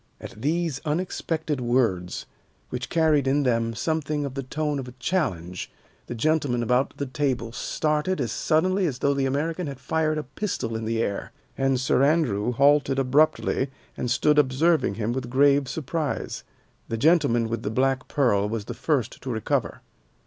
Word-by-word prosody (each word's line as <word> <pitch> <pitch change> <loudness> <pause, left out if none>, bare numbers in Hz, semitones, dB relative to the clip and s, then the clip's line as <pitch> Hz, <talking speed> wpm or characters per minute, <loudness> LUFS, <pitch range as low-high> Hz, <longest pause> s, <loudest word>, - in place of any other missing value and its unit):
At 110 -2 -10
these 160 0 0
unexpected 160 -2 -2
words, 115 -8 0 0.4
which 125 0 -4
carried 155 -4 +3
in 140 +2 +2
them 115 -3 +1
something 150 +3 -1
of 135 - -5
the 135 - -3
tone 150 +2 -2
of 130 - -6
a 125 - -9
challenge, 95 - -2 0.4
the 120 - -5
gentlemen 135 -2 +1
about 125 +3 +1
the 140 - -2
table 130 -4 -1
started 150 +7 -1
as 120 -5 -1
suddenly 185 +7 +1
as 135 -5 -3
though 140 +2 +2
the 135 -1 0
American 160 +5 -1
had 140 -2 -6
fired 155 +4 0
a 155 - -2
pistol 130 - -3
in 110 0 -3
the 115 +1 0
air, 100 - -3 0.2
and 135 -1 +1
Sir 130 0 +2
Andrew 130 -8 +2
halted 140 +1 +3
abruptly 135 0 +2 0.3
and 125 - -3
stood 150 +4 +3
observing 145 - +2
him 115 +1 -1
with 130 -1 -4
grave 140 +1 +4
surprise. 155 +1 -3 0.5
The 115 - -2
gentleman 140 -5 +3
with 115 0 -3
the 105 - -2
black 130 +3 0
pearl 105 -8 +2
was 110 -2 -3
the - - -5
first 135 -7 -1
to 130 - -6
recover. 110 -4 -1
135 Hz, 170 wpm, -25 LUFS, 120-155 Hz, 0.5 s, grave